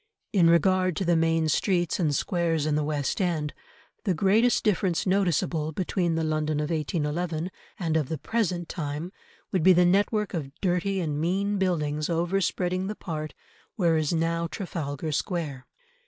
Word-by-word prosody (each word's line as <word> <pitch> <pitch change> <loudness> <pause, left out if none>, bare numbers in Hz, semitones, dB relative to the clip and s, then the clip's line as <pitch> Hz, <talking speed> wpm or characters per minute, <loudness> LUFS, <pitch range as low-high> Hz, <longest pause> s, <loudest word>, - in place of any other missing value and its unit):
In 175 -5 +5
regard 185 +1 +3
to 190 - -2
the 170 0 +3
main 165 0 +2
streets 175 +2 +1
and 155 -5 +1
squares 165 -3 0
in 155 - +1
the 150 0 +1
West 145 +3 -1
End, 160 -5 -1 0.5
the 190 -5 +1
greatest 210 +7 +3
difference 185 -4 +1
noticeable 170 -5 +1
between 175 -1 0
the 165 - 0
London 155 -1 0
of 150 +2 -2
1811 160 +2 -2 0.3
and 165 -4 -1
of 155 -5 +1
the 160 - -2
present 180 - -1
time 150 +2 -4 0.4
would 185 - +1
be 185 +3 +7
the 180 0 +5
network 205 +3 +2
of 145 -5 -5
dirty 190 +1 0
and 150 -3 -2
mean 195 +4 0
buildings 155 -5 0
over 175 +3 +1
spreading 185 +1 -1
the 210 - -4
part 155 -6 -5 0.4
where 170 -5 +2
is 155 -2 +1
now 165 0 0
Trafalgar 160 -5 -4
Square. 150 -5 -3
170 Hz, 165 wpm, -27 LUFS, 155-185 Hz, 0.5 s, be